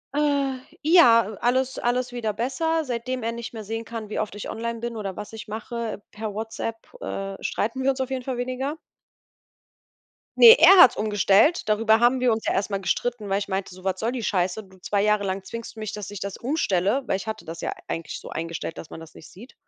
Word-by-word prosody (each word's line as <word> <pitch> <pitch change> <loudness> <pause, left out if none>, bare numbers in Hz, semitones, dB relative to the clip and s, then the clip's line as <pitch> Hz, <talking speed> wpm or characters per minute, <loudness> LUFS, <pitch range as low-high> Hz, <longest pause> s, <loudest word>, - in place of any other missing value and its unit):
Äh, 280 -3 +1 0.2
ja, 235 - +6
alles 260 +2 +1
alles 245 +1 0
wieder 230 -3 -2
besser. 315 +9 -1
Seitdem 250 0 -3
er 230 - -1
nicht 235 0 -6
mehr 220 -2 -6
sehen 225 +2 -4
kann, 225 -2 -7
wie - - -3
oft 210 -2 -3
ich 205 - -6
online 230 0 -4
bin 235 0 -4
oder 195 -3 -4
was 210 +1 -7
ich 220 -1 -8
mache 220 0 -5
per 215 -1 -6
WhatsApp, 225 +1 -4 0.2
äh, 195 0 -4
streiten 230 +5 -2
wir 265 - +2
uns 265 - 0
auf 260 0 -3
jeden 260 -1 -3
Fall 255 -1 -3
weniger. 255 +4 -3 1.6
Ne, 460 0 +11
er 390 - +8
hat's 255 - +8
umgestellt. 210 - +3
Darüber 220 +1 +4
haben 240 +2 +4
wir 250 -1 +3
uns 220 - -4
ja - - +2
erst 200 +2 -1
mal 195 - -1
gestritten, 225 +1 -2
weil 195 - +2
ich 200 - -5
meinte 190 -1 -3
so: 185 - -14
„Was 190 -1 -1
soll 225 +2 -1
die 250 -2 -4
Scheiße? 185 +1 0
Du, 190 -1 -19
2 200 +2 0
Jahre 210 -1 +2
lang 190 0 -3
zwingst 230 +4 -8
du - - -10
mich, 215 -1 -5
dass 210 -3 -6
ich 205 -1 -7
das 200 0 -5
umstelle“ 235 - 0
weil - - +1
ich 195 - -9
hatte 220 0 -5
das 165 +1 -7
ja - - -2
e - - -2
eigentlich 165 -1 -5
so - - -10
eingestellt, 165 0 -5
dass 160 - -10
man - - -9
das 165 -1 -12
nicht - - -14
sieht. 235 +8 -14
225 Hz, 230 wpm, -24 LUFS, 200-250 Hz, 1.6 s, Ne